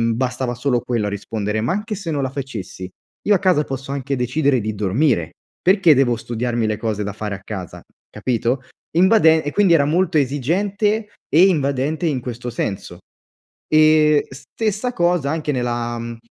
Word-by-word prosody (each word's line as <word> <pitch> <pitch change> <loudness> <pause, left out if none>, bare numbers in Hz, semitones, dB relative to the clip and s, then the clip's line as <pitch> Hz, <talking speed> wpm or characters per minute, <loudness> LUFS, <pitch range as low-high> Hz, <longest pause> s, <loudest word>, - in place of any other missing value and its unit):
bastava 125 0 -2
solo 125 0 0
quello 120 -3 -1
a - - -1
rispondere, 105 +1 -3
ma 120 +9 0
anche 210 +3 -3
se 190 -4 -6
non 145 -3 -1
la 135 - -1
facessi, 115 -9 -6 0.4
io 205 - +5
a - - +1
casa 185 -6 +3
posso 135 -1 -6
anche 140 0 -2
decidere 130 +2 +1
di 110 +1 -3
dormire, 100 - +1 0.3
perché 185 -3 +5
devo 130 -3 +3
studiarmi 120 0 -2
le 110 -1 -1
cose 110 -2 -2
da 105 0 -4
fare 105 -1 -4
a 95 - -11
casa, 95 -4 -7 0.3
capito? 125 +1 -1 0.4
Invade 175 -4 +5
e 145 - -3
quindi 200 -2 +4
era 145 -4 +4
molto 170 +2 +1
esigente 195 - 0 0.2
e 170 +5 +6
invadente 145 -1 0
in 140 -5 0
questo 120 0 -6
senso. 105 -4 -4 0.8
E 155 -1 +5
stessa 210 - -3
cosa 175 - +1
anche 155 -2 -2
nella, 120 -2 -2
mhmm, 115 0 -6
135 Hz, 170 wpm, -20 LUFS, 120-160 Hz, 0.8 s, e